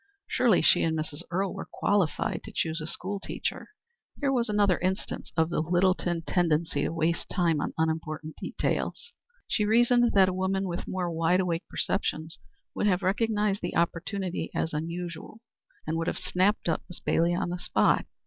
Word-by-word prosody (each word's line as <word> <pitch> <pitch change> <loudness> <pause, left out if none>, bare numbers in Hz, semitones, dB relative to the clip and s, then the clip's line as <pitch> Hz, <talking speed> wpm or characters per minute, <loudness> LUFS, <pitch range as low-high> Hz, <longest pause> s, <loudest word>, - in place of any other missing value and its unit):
Surely 230 -9 +3
she - - +5
and 160 -1 +1
Mrs. 155 0 -4
Earle 190 +2 -1
were - - -7
qualified 200 -6 0
to - - -8
choose 160 0 -1
a 155 - -5
school 195 +4 -4
teacher. - - -4 0.5
Here 280 -2 +1
was 235 -3 +1
another 205 -3 +3
instance 190 +2 -2
of 160 +1 +2
the - - 0
Littleton 175 0 +1
tendency 160 -4 +1
to - - 0
waste 165 +1 0
time 170 -5 +1
on - - -3
unimportant 160 -1 -2
details. - - -2 0.3
She 215 - +1
reasoned 240 +2 +4
that 195 -2 +6
a 185 - 0
woman 190 +1 0
with 175 -1 -4
more 180 -2 -2
wide 165 +2 +2
awake 175 -2 -1
perceptions 160 -4 -2 0.3
would 210 - 0
have 190 -1 +2
recognized 210 +1 +1
the 175 - -3
opportunity 180 +2 -1
as 160 - -1
unusual, 170 +5 -5 0.5
and 160 +1 -1
would 165 +1 -2
have - - -1
snapped 185 +3 +1
up 165 - +1
Miss 180 - -8
Bailey 170 +1 +2
on 175 - -1
the 180 - -3
spot. - - +2
175 Hz, 175 wpm, -28 LUFS, 165-195 Hz, 0.5 s, that